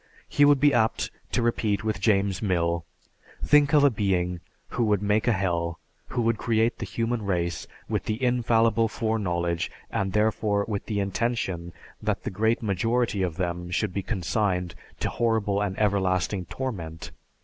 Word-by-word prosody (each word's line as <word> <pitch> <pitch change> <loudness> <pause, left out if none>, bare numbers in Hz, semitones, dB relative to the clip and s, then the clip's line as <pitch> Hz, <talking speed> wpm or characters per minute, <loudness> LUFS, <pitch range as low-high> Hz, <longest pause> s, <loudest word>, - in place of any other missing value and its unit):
He 145 - +4
would 145 -1 +5
be 145 0 +5
apt 110 -2 +1 0.2
to 120 - +1
repeat 110 -3 0
with 110 -3 -2
James 100 -3 +2
Mill, 85 -4 0 0.6
"Think 145 -1 +5
of 150 -2 +5
a 140 - +6
being 90 -5 0 0.3
who 120 - -1
would 105 -2 +1
make 105 +3 +1
a - - +5
Hell, 85 -4 -1 0.3
who 120 - -1
would 115 -1 +1
create 115 0 +1
the - - -4
human 115 0 -1
race 85 -4 -2 0.2
with - - -2
the 110 +1 -2
infallible 115 -2 +3
foreknowledge 90 -7 -1 0.2
and 95 -1 -1
therefore 105 -1 +1
with 105 -3 -3
the 105 -2 -1
intention 100 -4 -2 0.3
that - - -1
the - - -3
great 110 +4 +1
majority 115 +1 0
of 90 -4 -1
them 90 -1 -2
should 90 +1 -1
be 100 - -1
consigned 90 -2 -1 0.3
to - - 0
horrible 110 -3 +1
and 95 -2 -2
everlasting 95 -2 +1
torment." 85 -9 -5
105 Hz, 160 wpm, -26 LUFS, 90-115 Hz, 0.6 s, a